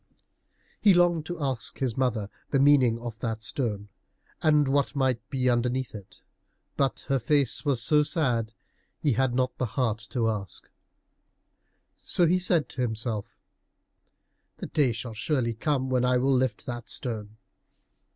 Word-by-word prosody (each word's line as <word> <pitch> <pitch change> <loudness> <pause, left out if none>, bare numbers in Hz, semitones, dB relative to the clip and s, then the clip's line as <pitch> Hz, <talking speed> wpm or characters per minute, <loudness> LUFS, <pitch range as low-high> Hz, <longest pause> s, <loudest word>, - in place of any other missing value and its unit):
He 200 -4 +5
longed 175 -3 +3
to 175 -1 -5
ask 130 -5 -1
his 125 -4 -1
mother 115 -6 -1 0.2
the 140 - +2
meaning 135 -4 +5
of 115 -2 -7
that 115 -2 -3
stone, 105 -5 -2 0.5
and 150 -2 +4
what 140 +1 +1
might 130 -3 +1
be 130 -2 -1
underneath 125 +1 0
it, 100 -3 -11 0.5
but 135 -1 0
her 135 -1 0
face 140 +1 +1
was 130 -5 +1
so 150 -1 +4
sad 130 -8 0
that 110 - -23 0.4
he 145 - +1
had 125 +1 +1
not 130 0 0
the 130 - 0
heart 115 -4 +1
to 120 -4 0
ask. 105 -4 -4 1.3
So 175 - +2
he 180 +3 +3
said 175 -4 +2
to 130 - -5
himself, 110 -3 -3 1.2
"The - - -6
day 140 -5 +2
shall 115 +1 -6
surely 120 0 -1
come 130 +2 -1
when 125 -1 +2
I 125 0 +3
will 135 +2 +2
lift 130 -1 0
that 120 -1 -6
stone." 110 -4 -4
125 Hz, 155 wpm, -27 LUFS, 115-140 Hz, 1.3 s, He